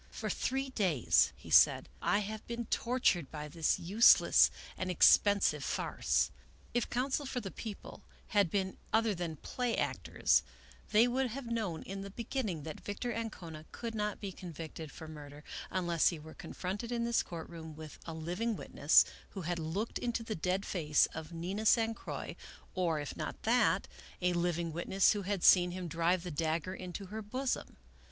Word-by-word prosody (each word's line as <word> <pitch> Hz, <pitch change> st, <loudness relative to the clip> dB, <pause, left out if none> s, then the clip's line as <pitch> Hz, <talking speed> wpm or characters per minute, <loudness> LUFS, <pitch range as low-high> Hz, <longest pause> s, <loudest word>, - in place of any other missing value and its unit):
" -, -, -26 dB
For -, -, -1 dB
three 270 Hz, +1 st, -1 dB
days," 180 Hz, -, +3 dB
he -, -, -12 dB
said, -, -, +6 dB
" -, -, -28 dB
I 205 Hz, -, +2 dB
have 215 Hz, +1 st, -6 dB
been 235 Hz, 0 st, -3 dB
tortured 230 Hz, -, +1 dB
by 150 Hz, -1 st, -6 dB
this 160 Hz, +1 st, +1 dB
useless 205 Hz, +7 st, +6 dB, 0.3 s
and 185 Hz, -, -3 dB
expensive 200 Hz, +3 st, +5 dB
farce. -, -, 0 dB, 0.4 s
If 240 Hz, -, 0 dB
counsel 265 Hz, +3 st, -1 dB
for 255 Hz, -, -2 dB
the 195 Hz, -5 st, -6 dB
People 215 Hz, -3 st, -8 dB, 0.3 s
had 205 Hz, -4 st, +3 dB
been 190 Hz, +1 st, -1 dB
other 225 Hz, -1 st, +3 dB
than 170 Hz, -3 st, -4 dB
play 245 Hz, -, -2 dB
actors, -, -, +2 dB, 0.5 s
they 225 Hz, +3 st, +5 dB
would 260 Hz, +2 st, +1 dB
have 255 Hz, +3 st, -6 dB
known 220 Hz, -9 st, -2 dB
in 195 Hz, +1 st, -6 dB
the 200 Hz, -, -6 dB
beginning 210 Hz, -, -3 dB
that 155 Hz, 0 st, -6 dB
Victor 240 Hz, +4 st, -3 dB
Ancona 170 Hz, -9 st, -6 dB
could 230 Hz, -1 st, -5 dB
not 210 Hz, -1 st, -2 dB
be 200 Hz, -2 st, -5 dB
convicted 165 Hz, -4 st, -8 dB
for 160 Hz, -, -9 dB
murder, 150 Hz, -1 st, -10 dB, 0.3 s
unless 175 Hz, -3 st, +2 dB
he 170 Hz, -, +1 dB
were 155 Hz, +1 st, -11 dB
confronted 205 Hz, +6 st, -5 dB
in 235 Hz, -1 st, 0 dB
this 235 Hz, 0 st, +2 dB
court 165 Hz, -2 st, -7 dB
room 160 Hz, -2 st, -9 dB
with 155 Hz, -1 st, -10 dB
a 165 Hz, -, -5 dB
living 180 Hz, +8 st, -2 dB
witness, 145 Hz, -5 st, +4 dB, 0.2 s
who 195 Hz, -, -7 dB
had 175 Hz, 0 st, -2 dB
looked 170 Hz, +8 st, -3 dB
into 235 Hz, -1 st, -2 dB
the 225 Hz, -, -3 dB
dead 185 Hz, +2 st, -1 dB
face 150 Hz, -5 st, +3 dB
of 160 Hz, +1 st, -7 dB
Nina 185 Hz, +6 st, -2 dB
San 225 Hz, 0 st, +4 dB
Croix; -, -, -6 dB, 0.4 s
or, 170 Hz, -4 st, 0 dB
if 145 Hz, -, -5 dB
not -, -, -5 dB
that, 215 Hz, -6 st, +3 dB, 0.3 s
a 180 Hz, 0 st, +1 dB
living 170 Hz, -1 st, -1 dB
witness 185 Hz, +4 st, +3 dB
who 205 Hz, -, -3 dB
had 195 Hz, -1 st, -2 dB
seen 180 Hz, -1 st, +7 dB
him 180 Hz, 0 st, -5 dB
drive 170 Hz, +2 st, +1 dB
the 180 Hz, -, -5 dB
dagger 160 Hz, +3 st, -1 dB
into 185 Hz, +1 st, -6 dB
her 220 Hz, -, -3 dB
bosom. 255 Hz, +5 st, -3 dB
185 Hz, 180 wpm, -33 LUFS, 165-225 Hz, 0.5 s, seen